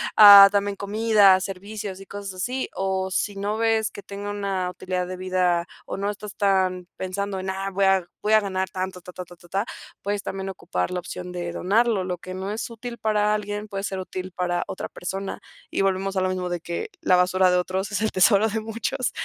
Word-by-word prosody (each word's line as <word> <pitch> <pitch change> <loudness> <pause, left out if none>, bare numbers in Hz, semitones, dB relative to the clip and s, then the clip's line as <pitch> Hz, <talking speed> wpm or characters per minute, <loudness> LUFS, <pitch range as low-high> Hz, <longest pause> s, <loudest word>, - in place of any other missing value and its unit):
ah, 200 -2 +11
también 200 0 0
comida, 205 -1 +4
servicios 195 +1 -6
y 195 - -11
cosas 200 0 -7
así, 250 +8 -2
o 190 0 -1
si 205 +1 -1
no 205 +2 -2
ves 225 -1 +1
que - - -9
tenga 200 0 -6
una 195 -3 -2
utilidad 180 0 -3
de 185 0 -6
vida 180 -2 +1 0.2
o - - -5
no 200 +1 -1
estás 205 0 -7
tan 185 -3 +1
pensando 195 +1 -3
en, 190 +1 -4
ah, 195 +1 -2
voy 195 +1 +1
a 190 -2 +3 0.2
voy 210 - 0
a 215 - +8
ganar 190 -2 -2
tanto, 185 0 -4
ta, 180 - -11
ta, 180 0 -7
ta, 175 - -14
ta, 175 0 -19
ta, 195 +4 0 0.4
puedes 205 0 -2
también 195 0 -4
ocupar 90 - -3
la 180 - -1
opción 180 0 -7
de 175 -1 -4
donarlo, 205 +2 +1
lo 180 -1 -3
que 185 +2 -8
no 190 +1 -4
es 220 +3 -4
útil 235 +1 -7
para 210 -1 +1
alguien 210 0 -3
puede 195 -2 -5
ser 190 -1 -3
útil 185 0 -6
para 175 -1 -1
otra - - -5
persona 195 +2 -5 0.3
y - - -1
volvemos 195 0 0
a 190 - +1
lo 185 - +1
mismo 185 -1 -2
de 175 -1 -3
que 170 +1 -4
la 185 - +4
basura 185 +1 +3
de 180 - +3
otros 190 +3 -2
es 205 -1 -1
el 220 - +1
tesoro 200 +3 +5
de 220 0 -2
muchos 230 +4 -2
195 Hz, 220 wpm, -24 LUFS, 185-205 Hz, 0.4 s, ah